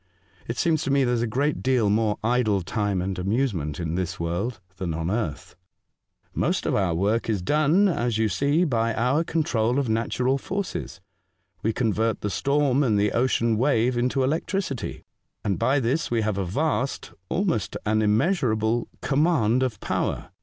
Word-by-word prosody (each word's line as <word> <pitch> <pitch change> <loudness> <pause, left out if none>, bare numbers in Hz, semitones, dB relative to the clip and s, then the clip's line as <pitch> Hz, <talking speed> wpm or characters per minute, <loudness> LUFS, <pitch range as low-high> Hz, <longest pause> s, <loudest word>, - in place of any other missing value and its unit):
"It - - -4
seems 160 -3 +2
to - - -2
me 140 0 +3
there 125 -1 +1
is 120 - 0
a 120 - 0
great 140 +7 0
deal 130 -5 +2
more 105 0 +1
idle 110 -5 +1
time 100 -1 -1
and 95 0 -3
amuse 115 +7 0
ment 75 -3 -4
in 80 -2 -2
this 90 -1 -3
world 90 +7 -2 0.2
than 85 -4 -3
on 80 +2 -2
earth." 100 -10 -3 0.4
" - - -59 0.3
Most - - 0
of - - 0
our 90 -4 +1
work 105 +7 0
is 100 -5 0
done, 155 - +3
as 120 - 0
you 110 0 +2
see, 140 - +1
by 115 -7 0
our 125 +7 +2
control 125 -8 0
of 140 -4 0
natural 125 +4 0
forces. 195 - -4 0.6
We 110 - +1
convert 110 -1 0
the 105 - -2
storm 140 +6 +2
and 115 -7 +2
the 105 0 +2
ocean 115 -2 +1
wave 125 -2 +2
into 125 +2 +1
electricity, 155 - -2 0.4
and 95 -5 -1
by 135 +2 +2
this 135 +6 0
we 115 -1 +1
have 105 -2 -1
a 95 - -1
vast 135 - -1
— 95 - -46
almost 170 - -1
an 110 +1 +2
immeasurable 110 - +1
— - - -37
command 135 -6 +2
of 125 -6 -1
power. - - -2
115 Hz, 180 wpm, -25 LUFS, 105-135 Hz, 0.6 s, me